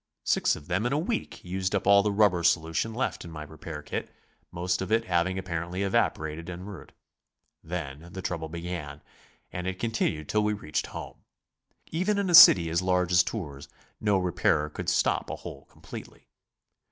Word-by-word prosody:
Six - - +2
of 75 - -11
them 95 +8 0
in 130 - -1
a - - +2
week 190 - -3
used 95 +2 -2
up 100 - -1
all 100 0 +7
the 105 +1 0
rubber 100 -4 +3
solution 80 +5 +1
left 120 +4 -2
in 85 - -9
my 75 -2 -7
repair 75 0 -8
kit, - - -4 0.4
most 90 +2 -1
of 95 - -4
it 115 +1 +2
having 90 0 +1
apparently 90 0 -3
evaporated 80 -4 -1
en 90 +1 -7
route. 100 -3 -10 0.7
Then 80 -1 -6
the 95 +1 -7
trouble 80 -2 -3
began. 85 -3 -6 0.5
And 90 +1 -4
it 95 0 -3
continued 95 -9 -1
till 105 0 +1
we 105 0 +1
reached 75 -7 -3
home. - - -8 0.7
Even 190 +6 0
in 200 -3 0
a - - 0
city 90 - +10
as 85 +2 +1
large 90 -1 +1
as 90 0 +6
Tours, 80 -8 -5 0.3
no 105 -2 +2
repairer 90 -4 +1
could - - -3
stop - - +1
a - - -3
hole - - -10
completely. - - -11
90 Hz, 180 wpm, -27 LUFS, 80-100 Hz, 0.7 s, city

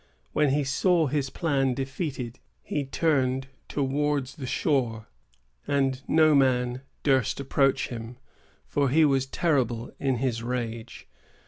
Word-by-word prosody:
When 150 -1 +3
he 145 +2 +2
saw 165 +5 +2
his 140 -1 -1
plan 135 -4 0
defeated, 135 -3 -4 0.2
he 145 -2 -2
turned 135 -3 0 0.2
towards 140 0 -1
the 135 -4 -5
shore; 120 -6 0 0.6
and 135 -2 +1
no 155 -1 +5
man 125 -2 +2 0.2
durst 135 -5 +2
approach 135 0 +1
him, 120 0 -7 0.5
for 140 -2 +1
he 155 +4 +5
was 135 -2 +2
terrible 130 -7 0
in 135 -2 +1
his 120 -2 -1
rage. 115 -2 -5
135 Hz, 125 wpm, -27 LUFS, 125-145 Hz, 0.6 s, no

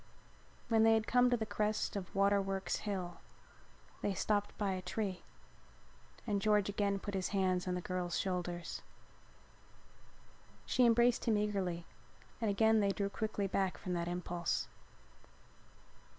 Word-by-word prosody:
When 225 -1 +3
they 225 0 +6
had 220 -1 +1
come 250 +1 +4
to 245 - +2
the 220 - -2
crest 210 +1 -1
of 195 -2 -5
Waterworks 195 -1 +1
Hill 185 -4 -4 0.8
they 200 - -1
stopped 205 +2 0
by 200 -2 0
a 185 - -3
tree 185 0 -3 1.0
and 205 -3 0
George 210 -1 +3
again 200 -1 0
put 205 +1 -6
his 190 -2 0
hands 185 -2 0
on 180 - 0
the 180 - -2
girl's 180 -1 -2
shoulders. 175 -2 -3 1.8
She 250 -2 +4
embraced 235 +1 +4
him 225 -3 +3
eagerly 190 -5 -1 0.6
and 225 - +1
then - - +2
again 220 +2 +4
they 200 -1 +2
drew 200 0 -1
quickly 215 -1 -2
back 195 -1 0
from 180 - -4
that 170 -1 -1
impulse. 175 -1 -2
200 Hz, 145 wpm, -35 LUFS, 185-215 Hz, 1.8 s, they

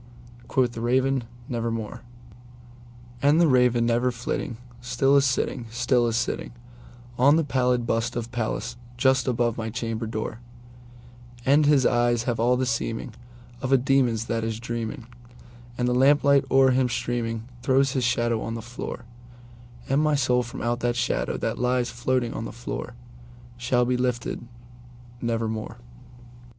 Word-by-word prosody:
Quoth 125 -2 +1
the 115 - -7
Raven, 130 +1 +1 0.2
"Nevermore."And 120 +2 -4
the 170 - +5
Raven, 125 -3 +3
never 120 +2 +2
flitting, 120 -1 -4 0.2
still 125 +3 +2
is 140 0 +5
sitting, 125 -2 -1
still 120 +1 +1
is 115 - -1
sittingOn 120 +3 -1
the 165 - +2
pallid 125 -4 +1
bust 115 +1 -1
of 120 0 -4
Pallas 120 -1 -3 0.2
just 130 +1 +3
above 120 -2 0
my 110 0 -3
chamber 115 0 -3
door; 110 0 -4 1.1
And 145 +2 +4
his 140 -4 +4
eyes 120 -1 +2
have 120 -2 -2
all 125 +2 +3
the 130 - 0
seeming 115 0 -2 0.5
of 130 - -2
a 135 - +7
demon's 125 -4 +2
that 115 -1 -2
is 110 -1 -3
dreaming, 115 +1 -4 0.7
And 125 - 0
the 125 - +2
lamp 140 +3 +4
light 140 -1 +4
o'er 135 0 +5
him 130 0 +2
streaming 115 -2 -2 0.2
throws 135 +1 +3
his 130 -2 -1
shadow 120 -2 +1
on 115 - -4
the 115 - -5
floor:And 120 +2 -6
my 155 -1 +2
soul 125 -2 +2
from 120 -1 -7
out 120 0 0
that 120 -1 0
shadow 125 0 -1
that - - -3
lies 125 0 +1
floating 120 0 -1
on 115 - -4
the - - -5 1.1
floorShall 125 0 +1
be 125 0 +1
lifted—nevermore! 120 -2 -4
120 Hz, 145 wpm, -25 LUFS, 120-125 Hz, 1.1 s, a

